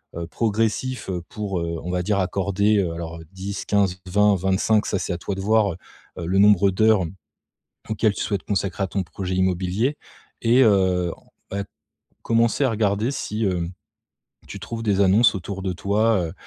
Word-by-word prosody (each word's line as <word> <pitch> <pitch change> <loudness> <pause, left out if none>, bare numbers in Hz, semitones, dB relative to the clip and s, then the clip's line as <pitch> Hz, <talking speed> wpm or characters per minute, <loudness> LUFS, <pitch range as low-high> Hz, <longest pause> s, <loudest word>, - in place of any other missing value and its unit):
heu, 85 0 -4
progressif, 115 +4 -1
heu, 90 -2 -2
pour, 100 -4 -3
heu, 85 0 -3
on 90 - -5
va 90 0 -1
dire 100 +1 +1
accorder, 100 +3 +1
heu, 85 -4 -1
alors 85 0 -6
10-15-20-25, 95 +1 +1
ça 100 - -1
c'est - - -2
à 85 - -3
toi 100 - -4
de 95 - -5
voir, 105 0 +3
heu - - -11 0.4
heu, - - -4
le 95 +2 +1
nombre 100 -1 +6
d'heures 110 0 +3 0.9
auxquelles 110 -1 +1
tu - - -3
souhaites 100 -2 -2
consacrer 95 -1 -1
à - - -1
ton 95 +2 -1
projet 95 +2 -5
immobilier 95 +8 0 0.5
et 120 +3 +5
heu, 95 -4 +3 0.4
en 100 - -2
fait, 100 - -3 0.6
commencer 115 +4 +2
à - - +2
regarder 105 +1 +1
si, 110 -4 -3
heu, 90 -3 0 0.8
tu - - -7
trouves 115 +2 -6
des 100 -3 +1
annonces 105 +4 +5
autour 95 +1 -5
de 95 -1 -1
toi, 100 0 +1
heu 80 - -8
100 Hz, 175 wpm, -23 LUFS, 90-110 Hz, 0.9 s, nombre